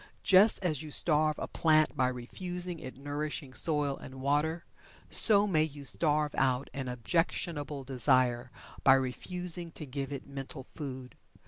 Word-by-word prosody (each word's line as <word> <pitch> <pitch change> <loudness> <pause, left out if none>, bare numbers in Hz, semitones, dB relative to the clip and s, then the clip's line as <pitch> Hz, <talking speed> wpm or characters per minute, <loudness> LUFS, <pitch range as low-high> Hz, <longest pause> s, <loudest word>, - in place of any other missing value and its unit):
Just 200 +3 +6
as 155 -6 0
you 155 - -8
starve 155 0 +1
a - - -4
plant 155 -1 +2
by 130 - +2
refusing 175 +8 -5
it 130 -4 -9
nourishing 145 0 -5
soil 145 -2 +1
and 130 - -11
water, 150 +5 0 0.5
so 205 -2 +6
may 170 -7 +2
you 145 -2 -4
starve 150 0 +1
out 130 0 0
an 135 -2 -4
objectionable 145 +3 -2
desire 130 -1 +2 0.3
by 135 - +7
refusing 175 +6 -1
to 155 - -6
give 135 0 -5
it 140 -2 -6
mental 135 -1 -7
food. 130 -4 -7
145 Hz, 145 wpm, -30 LUFS, 130-160 Hz, 0.5 s, by